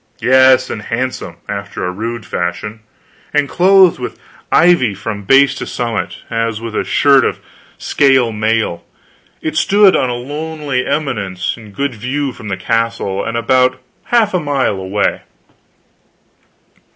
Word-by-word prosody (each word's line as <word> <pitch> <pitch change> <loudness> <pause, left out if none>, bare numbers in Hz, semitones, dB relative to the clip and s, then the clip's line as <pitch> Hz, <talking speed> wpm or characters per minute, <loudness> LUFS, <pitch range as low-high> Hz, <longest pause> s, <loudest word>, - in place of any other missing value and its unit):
Yes, 130 0 +4
and 105 - -5
handsome, 130 +4 -4
after 100 -2 -5
a 90 - -2
rude 115 +4 -5
fashion, 90 +5 -4 0.6
and 145 -1 +2
clothed 185 +1 +4
with 125 - -6 0.3
ivy 170 - +4
from 100 +1 -6
base 135 +3 +5
to 140 - -6
summit, 115 -3 -4
as 115 -1 -2
with 115 -1 -6
a - - 0
shirt 140 -3 +4
of - - -1 0.4
scale 135 -5 +2
mail. 110 -4 -1 0.6
It 155 -1 -3
stood 200 -1 +5
on 130 - +1
a 120 - -2
lonely 145 0 -4
eminence, 110 -11 -2
in 110 -3 -13
good 140 +5 -2
view 130 +5 -3
from 115 -3 -10
the 95 -2 -3
castle, 115 -1 -1
and 115 - -3
about 125 +2 +2 0.3
half 225 -4 +2
a 180 - +2
mile 140 - 0
away. 95 +2 -1
125 Hz, 140 wpm, -16 LUFS, 110-140 Hz, 0.6 s, base